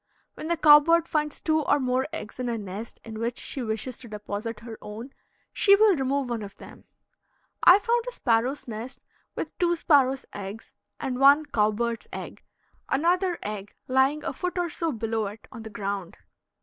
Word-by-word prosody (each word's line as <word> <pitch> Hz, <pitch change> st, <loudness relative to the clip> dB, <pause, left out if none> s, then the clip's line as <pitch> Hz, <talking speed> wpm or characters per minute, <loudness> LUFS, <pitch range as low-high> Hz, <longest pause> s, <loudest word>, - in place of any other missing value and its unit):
When 310 Hz, -, -7 dB
the 340 Hz, 0 st, 0 dB
cow 295 Hz, -2 st, +9 dB
bird 335 Hz, +2 st, +2 dB
finds 300 Hz, -1 st, -1 dB
two 315 Hz, -1 st, +2 dB
or 290 Hz, -, +2 dB
more 255 Hz, 0 st, 0 dB
eggs 220 Hz, -, -7 dB
in 250 Hz, -1 st, -2 dB
a 230 Hz, -, -1 dB
nest 205 Hz, +2 st, -7 dB
in 220 Hz, -1 st, -8 dB
which 235 Hz, +1 st, -2 dB
she 270 Hz, -, -4 dB
wishes 230 Hz, +2 st, -3 dB
to 245 Hz, -, -8 dB
deposit 210 Hz, +1 st, -5 dB
her 230 Hz, -1 st, -9 dB
own, 225 Hz, +6 st, -8 dB, 0.4 s
she 400 Hz, -1 st, +6 dB
will 415 Hz, -2 st, +5 dB
remove 270 Hz, -1 st, 0 dB
one 230 Hz, -2 st, -2 dB
of 200 Hz, -1 st, -9 dB
them. -, -, -13 dB, 0.8 s
I 360 Hz, -, +9 dB
found 470 Hz, +3 st, 0 dB
a -, -, -2 dB
sparrow's 250 Hz, -, 0 dB
nest 240 Hz, +4 st, -6 dB, 0.4 s
with -, -, -5 dB
two 345 Hz, -1 st, +3 dB
sparrow's 270 Hz, -5 st, +3 dB
eggs 205 Hz, +2 st, -8 dB, 0.3 s
and 255 Hz, -1 st, -3 dB
one 285 Hz, +3 st, +6 dB
cow 215 Hz, -7 st, +2 dB
bird's 230 Hz, +1 st, -3 dB
egg, -, -, -8 dB, 0.5 s
another 350 Hz, +5 st, +2 dB
egg 205 Hz, -1 st, -6 dB
lying 265 Hz, +4 st, +2 dB
a -, -, -3 dB
foot 360 Hz, 0 st, -4 dB
or 350 Hz, -2 st, -1 dB
so 330 Hz, +1 st, -1 dB
below 225 Hz, -3 st, -2 dB
it 210 Hz, +3 st, -10 dB
on 230 Hz, -, -9 dB
the 220 Hz, -, -8 dB
ground. 200 Hz, -3 st, -4 dB
255 Hz, 190 wpm, -26 LUFS, 220-305 Hz, 0.8 s, cow